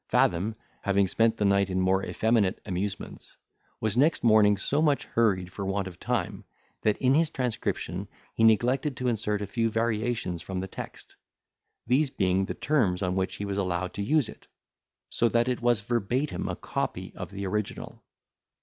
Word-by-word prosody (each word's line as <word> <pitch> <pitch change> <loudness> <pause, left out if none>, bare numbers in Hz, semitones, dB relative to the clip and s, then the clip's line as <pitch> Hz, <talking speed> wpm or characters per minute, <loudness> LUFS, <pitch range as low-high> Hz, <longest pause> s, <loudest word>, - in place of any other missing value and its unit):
Fathom, 95 +6 +2 0.3
having 100 0 +2
spent 115 +3 +2
the 105 - +1
night 100 -1 +3
in 95 0 0
more 95 +1 +2
effeminate 110 -4 +1
amusements, 95 0 -5 0.4
was 110 -1 0
next 150 +6 +3
morning 110 -3 +5
so 140 +9 0
much 150 -3 +2
hurried 95 -6 +1
for 100 - -5
want 95 0 -1
of 90 -1 -10
time, - - -2 0.4
that 105 -1 +2
in 130 0 +3
his 160 +2 +3
transcription 125 -6 -3 0.3
he 115 - 0
neglected 125 +5 +3
to 125 - -2
insert 105 -3 0
a - - -2
few 115 +3 0
variations 115 -5 -1
from 95 +2 -4
the 95 - -4
text, - - -9 0.7
these 135 +5 +2
being 95 -4 +1
the - - -5
terms 105 -12 +1
on 90 0 0
which 95 0 -1
he 100 - -4
was 100 0 -2
allowed 90 -1 -1
to 100 - -4
use 140 +4 +2
it; - - -13 0.6
so 120 - +2
that 120 +1 +2
it 125 -1 -1
was 120 -2 +2
verbatim 120 +6 -1
a - - -2
copy - - -4
of - - -6
the 100 0 -5
original. 105 +2 -4
105 Hz, 175 wpm, -27 LUFS, 95-120 Hz, 0.7 s, morning